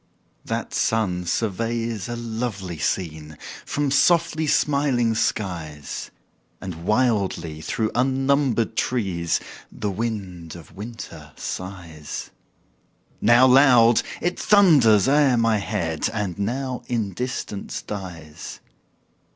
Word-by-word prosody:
That - - -4
sun 90 -6 0
surveys 115 +3 -2
a 120 - -3
lovely 110 -7 -4
scene 80 -3 -3 0.3
From 145 -1 0
softly 160 +1 +3
smiling 140 -6 +2
skies; 85 -9 -3 0.5
And 85 -3 -7
wildly 100 -9 0
through 110 +6 -1
unnumbered 135 -2 +1
trees 95 -9 0 0.3
The 105 -1 -3
wind 95 -6 -4
of 85 - -13
winter 95 -9 -9
sighs: 85 -5 -6 0.9
Now 120 +2 +6
loud, 125 -3 +6 0.2
it 180 0 -1
thunders 145 - +5
o'er 140 -3 +4
my 115 -1 +3
head, 90 -6 -2
And 105 -6 -2
now 125 +5 -2
in 110 -5 -1
distance 125 -3 -4
dies. 85 -7 -8
110 Hz, 100 wpm, -23 LUFS, 90-125 Hz, 0.9 s, Now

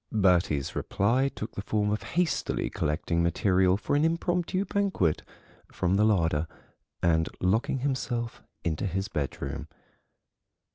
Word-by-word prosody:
Bertie's 90 -9 +2
reply 125 +7 +1
took 110 - -6
the - - -4
form 105 0 0
of 105 - -1 0.2
hastily 180 -3 0
collecting 85 +3 0
material 90 +2 +3
for 115 - -1
an 145 - +3
impromptu 175 +3 0
banquet 190 - +1 0.5
from 90 +1 0
the 105 - +4
larder 85 -7 +2 0.6
and 80 -2 +3
locking 115 +8 +1
himself 125 -4 -2 0.2
into 85 +3 -1
his 95 +2 -2
bedroom. 70 -5 -4
100 Hz, 125 wpm, -28 LUFS, 85-130 Hz, 0.6 s, the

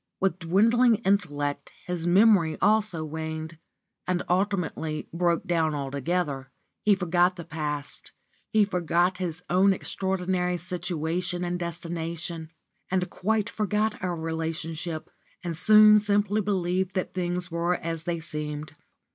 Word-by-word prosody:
With 190 -2 0
dwindling 225 +8 +4
intellect 145 -8 0
his 175 -1 -3
memory 185 -3 +5
also 210 -7 +2
waned, 160 +1 -5 0.5
and 180 -1 0
ultimately 180 -4 -1
broke 170 -1 +1
down 160 -3 +1
altogether. 140 0 -2 0.3
He 210 -1 +4
forgot 180 -1 +2
the 170 - -7
past, 150 -2 -5 0.4
he 215 -1 +4
forgot 180 -1 +1
his 180 -1 -4
own 190 +2 +4
extraordinary 185 -1 -1
situation 175 +1 -3
and 175 0 -2
destination, 170 -1 -4 0.4
he 185 - +2
quite 215 +3 -1
forgot 215 0 -1
our 180 -1 -1
relationship, 160 0 -4 0.3
and 170 -2 -3
soon 210 +4 +7
simply 205 0 +1
believed 185 -1 -1
that 185 - -2
things 180 0 -1
were 170 +2 +1
as 165 -1 -3
they 170 -1 -1
seemed. 150 -1 -3
175 Hz, 120 wpm, -26 LUFS, 160-190 Hz, 0.5 s, soon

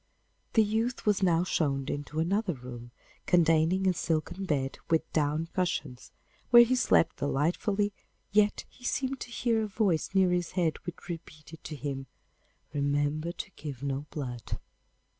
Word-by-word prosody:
The 220 - +6
youth 225 +4 -1
was 205 -2 +3
now 175 -2 +3
shown 140 -6 0
into 145 +2 -3
another 190 +3 +1
room, 120 -1 -9 0.4
containing 170 +2 +4
a 185 - +4
silken 165 +3 -2
bed 135 -5 -1
with 160 -1 +2
down 155 +2 +1
cushions, 150 -8 -2 0.4
where 240 0 +10
he 250 +2 +2
slept 230 -9 +3
delightfully, 190 +9 0 0.4
yet 210 0 +3
he 250 - -21
seemed 265 +1 -1
to - - -6
hear 230 -1 +1
a 215 - -1
voice 195 -4 0
near 190 -2 +5
his 175 -2 -1
bed 170 -4 +1
which 175 - -7
repeated 160 -2 -9
to 155 - -5
him, 135 -1 -4 0.7
'Remember 145 +3 0
to 190 - -7
give 140 -7 -8
no 140 +1 -2
blood! 125 -5 -5
165 Hz, 150 wpm, -29 LUFS, 145-195 Hz, 0.7 s, where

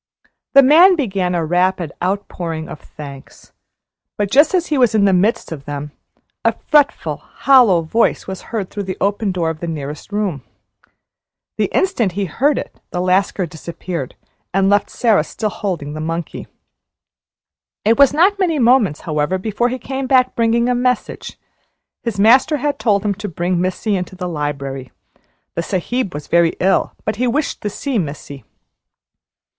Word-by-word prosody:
The 275 0 +8
man 340 +8 +7
began 195 - -1
a 170 -2 0
rapid 180 -1 0
outpouring 175 -4 -3
of - - -8
thanks; 140 -3 -12 0.7
but, 205 -1 -1
just 300 +7 +5
as 350 -2 +1
he 300 - -1
was 240 -4 +3
in 205 -2 +4
the 195 - +4
midst 210 +5 +1
of 140 -4 -7
them, 145 0 -5 0.5
a - - +3
fretful, 295 -2 +1
hollow 240 -11 +3
voice 225 +9 +1
was 190 0 -6
heard 210 -5 -3
through 205 -1 -4
the 185 - -3
open 205 +1 0
door 170 -3 -1
of 160 - -9
the 170 - -5
nearest 150 +2 -6
room. 200 -9 -2 1.2
The - - +3
instant 245 - +1
he 200 +1 -1
heard 275 - +1
it - - -7
the 180 - -4
Lascar 185 +1 +1
disappeared, 165 -2 -6 0.4
and 195 0 +3
left 205 - +2
Sara 220 -9 +2
still 210 +6 -4
holding 170 -9 -4
the 155 - -5
monkey. 165 +1 -4 1.4
It 225 +4 +3
was 280 -2 +7
not 370 +7 +3
many 345 -5 +1
moments, 235 - +3
however, 155 +2 -1
before 220 +5 -1
he 255 - -3
came 265 +2 -4
back 255 -1 +3
bringing 235 +1 +2
a 250 - +2
message. 250 0 -2 0.6
His 230 -4 -4
master 255 +8 +5
had 290 0 -2
told 205 -3 +1
him 205 - +1
to 205 +2 -6
bring 175 +1 -1
Missy 185 +3 -1
into 185 0 -4
the 180 -1 -4
library. 140 -5 -4 0.6
The - - -2
Sahib 195 +4 -2
was 150 - -6
very 170 -1 +2
ill, 190 +2 +1
but 215 -1 -2
he 250 +2 +1
wished 285 +5 -1
to 210 - -2
see 260 +3 -2
Missy. 140 -4 -6
195 Hz, 165 wpm, -18 LUFS, 170-245 Hz, 1.4 s, The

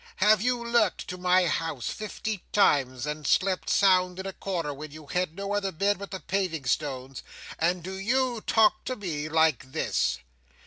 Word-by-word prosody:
Have 210 0 +4
you 245 0 0
lurked 235 -5 +1
to 180 - -5
my 180 0 +4
house 160 -5 -2
fifty 215 -1 -5
times, 135 -10 +2
and 150 -1 -4
slept 190 -1 +1
sound 185 -2 +3
in 190 - -5
a 195 - -4
corner 170 -8 -3
when 150 +2 -8
you 155 +1 -12
had 180 +2 -2
no 200 +1 -3
other 200 -1 0
bed 200 +4 0
but 200 - -7
the 190 - -5
paving 170 -3 -2
stones, 130 0 -2 0.4
and 175 +1 +1
do 190 +2 -6
you 240 +4 0
talk 220 -1 +4
to 255 - -2
me 155 -8 -4
like 155 -4 +2
this! 65 - 0
180 Hz, 180 wpm, -27 LUFS, 150-200 Hz, 0.4 s, Have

